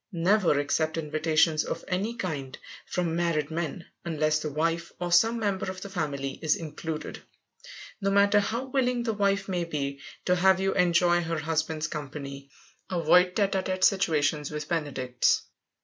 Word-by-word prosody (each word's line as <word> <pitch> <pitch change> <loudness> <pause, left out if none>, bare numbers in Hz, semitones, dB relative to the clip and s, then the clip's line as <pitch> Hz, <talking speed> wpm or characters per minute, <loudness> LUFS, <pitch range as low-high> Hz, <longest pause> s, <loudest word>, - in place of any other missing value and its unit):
Never 180 -2 +3
accept 155 +3 0
invitations 155 0 +2
of 165 - -5
any 200 +6 -1
kind 150 - -4 0.3
from 170 -2 -1
married 165 -3 0
men, 170 +1 -3 0.2
unless 155 -2 +1
the 155 - -3
wife 165 +3 -1
or 175 -1 -3
some 225 +7 +4
member 200 -4 -1
of 185 0 -7
the 200 - -7
family 140 -6 -3
is 155 -2 +2
included. 160 0 -6 0.8
No 195 - +1
matter 200 +1 +5
how 230 +5 -2
willing 250 -2 0
the 225 -2 -1
wife 200 -1 +1
may 180 -3 -1
be 140 -4 -3 0.3
to 180 - +3
have 190 0 +4
you 195 0 +1
enjoy 175 -1 +3
her 165 -1 -2
husband's 160 0 -1
company, 140 -2 -6 0.4
avoid 180 0 +4
tête 200 -2 +2
à 190 -1 0
tête 185 0 -2
situations 155 -6 +2
with 150 -1 -5
benedicts. 135 -7 0
170 Hz, 160 wpm, -27 LUFS, 155-190 Hz, 0.8 s, matter